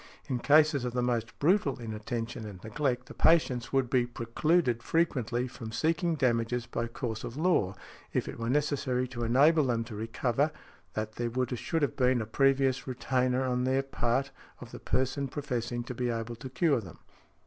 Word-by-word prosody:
In 130 -4 -1
cases 150 0 +4
of 125 -1 -3
the 125 0 0
most 120 -2 -1
brutal 155 -4 +2
inattention 115 +1 -4
and 100 -3 -9
neglect, 125 +2 -1
the - - -11
patients 130 -7 +3
would 135 -2 +2
be 120 -1 +2
precluded 120 +2 +1
frequently 125 -7 0
from 115 -3 -8
seeking 165 +6 +1
damages 120 -3 +1
by 120 0 -3
course 115 -1 -4
of 120 - -6
law, 155 - +2 0.4
if - - -1
it - - -7
were 115 0 -2
necessary 130 -3 0
to 120 -2 -4
enable 145 +6 +4
them 120 -2 0
to 115 -2 -9
recover, 115 +6 0 0.5
that 110 0 -2
there 120 0 -1 0.3
should 160 +6 -1
have 145 - 0
been 125 -2 +3
a 110 - -2
previous 135 +3 +2
retainer, 130 0 0
on 125 -1 0
their 130 +1 +2
part, 135 0 -1 0.3
of - - -10
the - - -8
person 130 +2 0
professing 125 -4 -3
to 125 - -6
be 125 0 -1
able 115 0 -3
to 125 +3 -8
cure 140 0 +2
them. 90 -6 -11
125 Hz, 180 wpm, -30 LUFS, 115-140 Hz, 0.5 s, cases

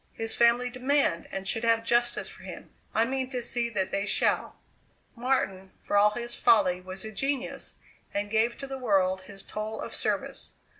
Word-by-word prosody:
His 225 0 -2
family 240 +1 +4
demand 255 -8 +1
and 195 0 -4
should 225 +3 0
have 230 0 +3
justice 240 +1 +2
for - - -10
him - - -9 0.2
I 225 - +3
mean 260 +1 -2
to 255 -2 -2
see 240 0 -1
that 195 -5 -1
they 200 +1 -1
shall. - - +1 0.6
Martin, 195 -7 -1
for - - -1
all 205 +1 +7
his 240 +2 -4
folly 195 -6 +4
was 185 +2 -6
a 220 - -5
genius, 270 +4 -2 0.4
and 205 0 -2
gave 225 +2 +2
to 275 - -6
the 270 -1 -6
world 190 -5 +2
his 195 0 -10
toll 215 +1 -5
of - - -5
service. - - -2
225 Hz, 185 wpm, -28 LUFS, 195-245 Hz, 0.6 s, all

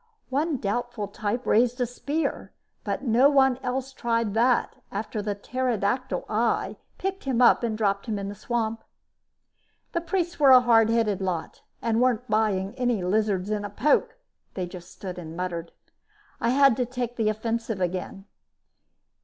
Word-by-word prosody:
One 295 +2 0
doubtful 235 0 -2
type 215 +4 -3
raised 245 +3 +3
a 245 - +2
spear, 285 +6 -3 0.3
but 275 - -3
no 250 +2 +5
one 265 -3 +4
else 265 +1 -3
tried 230 -4 -1
that 235 +2 +2
after 210 +1 -3
the 205 0 -2
pterodactyl 245 +2 -1
eye 225 +2 0 0.2
picked 385 -2 -4
him 260 -3 0
up 245 - +6
and 225 -3 -1
dropped 200 -1 0
him 215 -2 -1
in 200 0 -4
the 200 - -5
swamp. 225 +1 -2 1.1
The 340 - -1
priests 345 0 -2
were 285 -2 +6
a 255 -1 +10
hard 225 -2 +4
headed 225 -4 +1
lot 180 -4 -3 0.2
and 230 0 +1
weren't 250 -1 +1
buying 210 -3 +1
any 245 -6 +1
lizards 200 0 0
in 210 -1 -1
a 205 - -4
poke; 300 - +1 0.4
they 185 - -2
just 175 0 -10
stood 180 -2 -7
and 165 -1 -8
muttered. 175 -2 -4 0.7
I 235 - +1
had 275 -1 +5
to 250 - +1
take 245 -1 -4
the 220 -2 +1
offensive 225 0 -2
again. 185 +2 -3
230 Hz, 160 wpm, -26 LUFS, 205-255 Hz, 1.1 s, a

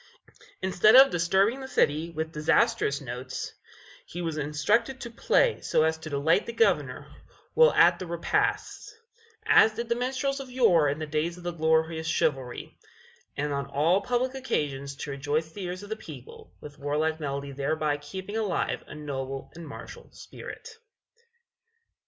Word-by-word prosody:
Instead 190 +4 +5
of 270 +1 +9
disturbing 190 +8 +2
the 265 - -7
city 155 - +1
with 160 -1 -4
disastrous 150 -2 +1
notes, 130 0 -6 0.5
he 175 - -9
was 165 -3 -2
instructed 205 - 0
to 235 -3 -7
play 470 - +2
so - - +2
as 160 0 +2
to 160 0 -9
delight 155 +7 +2
the 235 - -4
Governor 455 - +1 0.5
while 480 +1 +6
at - - +5
his 185 - -6
repasts, 170 - -1 0.5
as 220 0 +6
did 235 +1 -4
the 235 - +2
minstrels 265 +3 -1
of 270 -1 -8
yore 180 - +4
in 145 - -2
the 155 - -4
days 155 +3 -2
of 180 - -12
the 175 - -2
glorious 160 0 +1
chivalry 135 -6 -2 0.6
and 145 0 -1
on 140 0 -2
all 155 +8 +2
public 250 +1 -1
occasions 140 - -3
to 145 +1 -6
rejoice 145 +3 -2
the 195 +1 -6
ears 180 +2 -5
of 205 - -10
the 220 - -2
people 150 - -12
with 150 0 -11
warlike 155 +3 -1
melody 140 -1 -4
thereby 145 +2 -1
keeping 190 +8 -7
alive 215 -4 -1
a - - -10
noble 135 -2 -5
and 170 -1 -10
martial 140 - -10
spirit. 455 0 -10
160 Hz, 160 wpm, -27 LUFS, 145-215 Hz, 0.6 s, of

